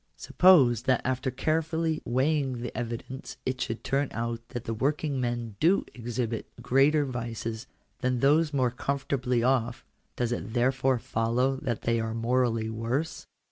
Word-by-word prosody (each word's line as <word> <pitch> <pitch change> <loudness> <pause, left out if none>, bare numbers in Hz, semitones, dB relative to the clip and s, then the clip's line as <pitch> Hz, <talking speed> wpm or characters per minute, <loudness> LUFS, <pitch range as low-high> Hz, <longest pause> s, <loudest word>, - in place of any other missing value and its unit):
Suppose 135 - +5
that 130 - +3
after 130 +1 0
carefully 160 +4 0
weighing 130 0 0
the 120 - -5
evidence 120 +2 -5
it 130 -1 -2
should 115 - -3
turn 140 +1 +1
out 115 0 -3
that 120 -3 -5
the 115 - -3
working 140 +3 -1
men 120 -3 -3
do 180 +5 +3
exhibit 120 -1 -3
greater 145 +3 +3
vices 115 -1 -4 0.3
than 125 -1 0
those 150 +4 +4
more 130 -4 +1
comfortably 125 -2 -1
off; 125 -1 +1 0.3
does 120 -1 -1
it 120 -2 -4
therefore 130 +1 +2
follow 120 +4 0
that 120 -3 -3
they 115 0 +1
are 110 0 -2
morally 115 -1 +1
worse 115 +8 -3
125 Hz, 145 wpm, -28 LUFS, 115-135 Hz, 0.3 s, Suppose